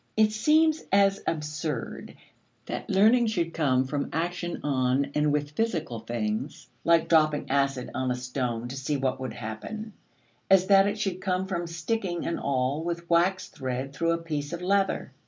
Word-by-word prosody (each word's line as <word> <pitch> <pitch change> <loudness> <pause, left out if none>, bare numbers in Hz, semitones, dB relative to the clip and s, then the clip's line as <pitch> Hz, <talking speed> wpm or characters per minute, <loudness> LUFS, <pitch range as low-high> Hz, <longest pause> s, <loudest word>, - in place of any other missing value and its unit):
It 215 -1 +5
seems 310 +8 +3
as 195 0 +4
absurd 150 -4 -3 0.5
that - - -5
learning 225 +5 +5
should 170 -6 -1
come 130 -5 +2
from 140 +1 -2
action 175 +2 -2
on 135 0 +1
and 150 0 +2
with 145 0 -1
physical 165 - -2
things, 115 +5 -3 0.2
like 165 -1 +4
dropping 155 -4 +3
acid 135 -2 0
on 130 0 -1
a 125 - +1
stone 125 -2 -3
to 130 - -6
see 135 +2 -1
what 130 -1 -1
would 130 -1 -4
happen, 200 - -6 0.6
as 190 -1 +6
that 195 0 +6
it 205 - -1
should 195 -3 -2
come 185 0 0
from 175 -3 -3
sticking 175 +2 -2
an 170 - -2
awl 140 +3 0
with 170 0 -4
waxed 185 +2 +2
thread 130 +1 -4
through 165 +3 +1
a - - 0
piece 150 -3 -4
of 170 +1 -5
leather. 195 +1 +1
160 Hz, 170 wpm, -27 LUFS, 135-190 Hz, 0.6 s, as